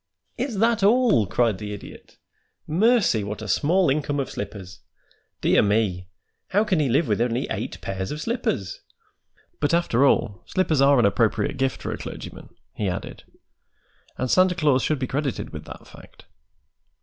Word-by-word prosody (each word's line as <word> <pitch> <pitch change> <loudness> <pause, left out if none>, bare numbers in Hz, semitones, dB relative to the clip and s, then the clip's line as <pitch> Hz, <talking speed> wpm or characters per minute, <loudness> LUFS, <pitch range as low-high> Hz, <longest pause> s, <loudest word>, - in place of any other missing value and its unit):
"Is 245 -3 -3
that 225 +1 +2
all?" 210 - +4
cried 110 +1 +1
the 105 -1 -5
Idiot. 100 - -12 0.5
"Mercy, 195 - +2
what 105 +2 -5
a - - -6
small 175 - +2
income 145 +1 0
of 135 - -3
slippers! 95 -3 -7 0.6
Dear - - +4
me! 100 -4 0 0.4
how 205 +3 +2
can 195 -6 +1
he 145 -3 +1
live 140 +5 +2
with 105 0 0
only 120 +1 0
eight - - -4
pairs 95 -1 -4
of 150 - -5
slippers? 225 - -3 0.8
But, 150 +3 +2
after 140 -7 +2
all, 105 -8 +2
slippers 160 -7 +1
are 140 0 +5
an 120 - +4
appropriate 115 +7 +1
gift 135 0 -1
for - - -3
a - - -5
clergyman," - - -9 0.2
he 105 -3 -2
added, 90 - -6 0.9
"and 130 - -2
Santa 185 -1 +4
Claus 145 -6 +2
should 155 - 0
be 130 - -2
credited 135 0 -3
with - - -8
that - - -11
fact. - - -16
135 Hz, 165 wpm, -24 LUFS, 105-175 Hz, 0.9 s, are